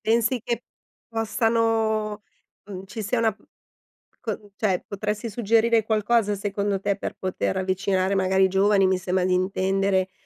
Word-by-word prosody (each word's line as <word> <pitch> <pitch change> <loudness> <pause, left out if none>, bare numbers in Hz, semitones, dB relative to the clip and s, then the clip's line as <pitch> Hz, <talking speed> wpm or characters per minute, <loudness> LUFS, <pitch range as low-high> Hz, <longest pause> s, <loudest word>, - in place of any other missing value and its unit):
Pensi 230 +2 +1
che 235 0 -2 0.5
possano, 225 -2 0 0.4
mhmm, 190 -2 -8
ci 220 +3 -6
sia 215 +4 -1
una 225 -1 +2
p - - -25 0.8
co 210 -2 -5
cioè, 195 -5 +1
potresti 210 +3 -3
suggerire 230 +1 +2
qualcosa, 215 0 +2
secondo 200 0 -1
te, 200 0 0
per - - -5
poter 185 0 -2
avvicinare 190 0 0
magari 190 0 +3
i - - +4
giovani, 195 +1 +3
mi 190 0 +2
sembra 185 0 0
di 185 - +1
intendere, 190 +1 +1
205 Hz, 145 wpm, -24 LUFS, 190-225 Hz, 0.8 s, i